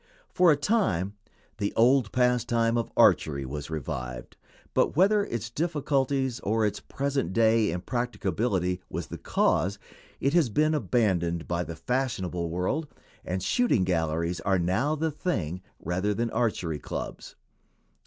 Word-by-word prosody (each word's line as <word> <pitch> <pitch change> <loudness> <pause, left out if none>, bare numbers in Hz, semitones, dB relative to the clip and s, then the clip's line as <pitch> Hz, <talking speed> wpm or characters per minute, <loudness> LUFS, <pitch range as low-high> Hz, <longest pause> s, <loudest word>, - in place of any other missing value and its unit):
For 180 -2 +5
a - - +5
time 145 - +1 0.5
the 100 -1 -1
old 125 -1 +4
pastime 120 -2 +2
of 115 -1 -1
archery 70 -3 +4
was 70 +3 -6
revived, 60 -5 -5 0.4
but, - - +2
whether 200 +4 +4
its 115 -1 -4
difficulties 135 -4 0
or 110 +1 +1
its 105 - -1
present 140 -10 -2
day 110 -1 +4
impracticability 95 -2 -1
was - - -4
the - - -8
cause, 95 +6 +1 0.4
it 140 - +1
has 170 -8 +4
been 155 +8 +2
abandoned 90 - 0
by 85 0 -1
the 85 0 -7
fashionable 95 - -2
world, 95 - -1 0.4
and 90 0 -3
shooting 245 - +2
galleries 85 -1 0
are 95 -1 +1
now 95 - +1
the 160 +1 -1
"thing" 95 - -2 0.2
rather 95 +5 -1
than 115 +1 -1
archery 90 -10 -1
clubs. - - -6
110 Hz, 135 wpm, -27 LUFS, 90-135 Hz, 0.5 s, For